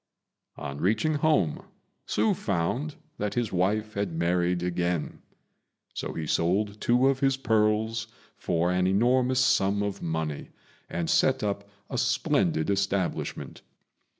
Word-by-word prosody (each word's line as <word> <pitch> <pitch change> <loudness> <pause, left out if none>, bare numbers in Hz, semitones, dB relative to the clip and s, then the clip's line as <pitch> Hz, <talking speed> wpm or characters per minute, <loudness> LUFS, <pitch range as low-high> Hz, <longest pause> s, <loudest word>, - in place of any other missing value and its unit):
On 70 -1 -6
reaching 110 - +2
home 145 - +1 0.4
Hsü 110 +1 +2
found 110 - -2 0.2
that 105 0 -2
his 120 -3 -1
wife 105 +4 0
had 100 -3 -2
married 90 +1 +1
again; 90 -2 -2 0.7
so - - -4
he 80 - -4
sold 100 +7 0
two 125 +2 +3
of 135 -1 +2
his 135 -1 +2
pearls 110 -2 +1 0.3
for 85 +1 0
an 90 0 +2
enormous 125 +6 +3
sum 100 -4 +2
of 100 -1 -3
money, 80 -3 -3 0.4
and 85 -1 -2
set 130 +11 +2
up 100 -1 -2 0.2
a - - -3
splendid 80 +5 +1
establishment. 100 -2 -2
100 Hz, 125 wpm, -27 LUFS, 85-110 Hz, 0.7 s, two